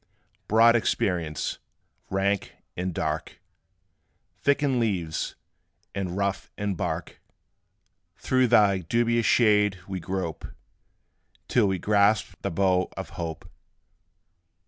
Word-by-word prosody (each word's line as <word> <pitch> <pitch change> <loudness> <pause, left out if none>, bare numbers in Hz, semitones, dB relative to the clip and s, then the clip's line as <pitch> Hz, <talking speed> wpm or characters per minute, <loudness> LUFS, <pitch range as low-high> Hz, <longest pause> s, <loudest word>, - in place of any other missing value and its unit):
Broad 115 +2 +6
Experience, 85 - -1 0.5
rank 100 +1 -1 0.2
and 90 +1 -2
dark; 80 -2 -3 1.0
Thick 140 +1 +2
in 135 -3 +2
leaves, 90 -9 -1 0.6
and 95 -2 -3
rough 100 -1 -1
in 100 -1 -1
bark; 90 - -4 1.0
Through 130 -1 +2
thy 105 -5 +4
dubious 115 +5 +1
shade 105 -4 +4
we 95 -1 -4
grope, 90 -2 -4 1.0
Till 115 -4 +3
we 95 -1 0
grasp 105 +2 +2
the - - -2
bough 90 +1 +1
of 95 - -6
Hope. 85 -4 -6
100 Hz, 100 wpm, -26 LUFS, 90-110 Hz, 1.0 s, Broad